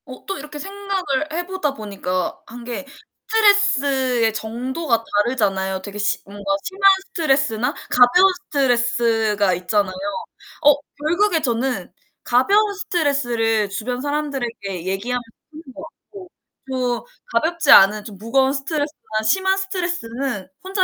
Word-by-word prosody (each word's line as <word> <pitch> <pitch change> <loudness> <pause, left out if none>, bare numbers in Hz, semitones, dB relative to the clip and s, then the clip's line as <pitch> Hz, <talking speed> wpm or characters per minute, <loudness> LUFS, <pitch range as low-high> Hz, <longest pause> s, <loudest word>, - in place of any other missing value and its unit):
어 255 -2 -11
또 390 - -4
이렇게 295 +1 -9
생각을 380 -5 -3
해 350 +2 -2
보다 370 -6 -2
보니까 195 -5 -3
한 240 +1 -10
게 245 +3 -5 0.5
스트레스의 275 - +3
정도가 235 +4 -2 0.2
다르잖아요. 195 -6 -1
되게 205 +1 -8
시 205 0 0
뭔가 200 +1 -11 0.2
심한 385 +1 -7 0.2
스트레스나 270 -10 +1 0.2
가벼운 355 +11 +5
스트레스가 235 -6 +1
있잖아요. 185 +2 0 0.7
어 295 0 +8 0.2
결국에 340 +4 +1
저는 250 0 -1 0.3
가벼운 405 - +3
스트레스를 250 - 0
주변 245 +5 -4
사람들에게 240 - -3
얘기하는 215 +7 -2 0.3
편인 315 +1 -11
것 290 - -10
같고 370 +3 -13 0.4
좀 250 -2 -1 0.3
가볍지 325 -2 +2
않은 210 0 +7
좀 205 -3 -10
무거운 265 +6 +2
스트레스나 285 -6 -3
심한 380 - +2
스트레스는 275 - -3 0.2
혼자 380 0 +1
260 Hz, 310 characters per minute, -21 LUFS, 220-325 Hz, 0.7 s, 어